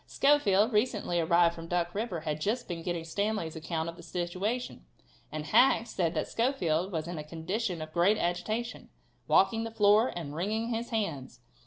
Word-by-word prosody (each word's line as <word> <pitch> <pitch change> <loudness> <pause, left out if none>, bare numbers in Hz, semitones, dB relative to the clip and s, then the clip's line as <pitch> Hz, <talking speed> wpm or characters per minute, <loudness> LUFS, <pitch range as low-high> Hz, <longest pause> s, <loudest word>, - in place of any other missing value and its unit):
Schofield, 235 -6 +3
recently 210 -5 +1
arrived 170 +1 +4
from 165 0 -9
Duck 175 0 -1
river, 205 -6 -3
had 155 -1 -3
just 230 +8 -1
been 170 -1 -4
getting 175 -1 -3
Stanley's 200 -1 -2
account 160 0 -3
of 170 0 -6
the - - -11
situation, 180 - -3 0.5
and 155 -1 -4
Hack 230 - +4
said 175 -7 -1
that - - -1
Schofield 190 - 0
was 160 -2 -3
in 175 -2 -5
a - - -5
condition 170 +3 -3
of 155 0 -11
great 185 +5 +3
agitation, 215 +8 -2 0.4
"walking 225 +4 +3
the 230 - -4
floor 215 +1 +4
and 155 -5 -5
wringing 215 +8 -2
his 230 0 -3
hands." 165 - -3
180 Hz, 175 wpm, -30 LUFS, 165-220 Hz, 0.5 s, arrived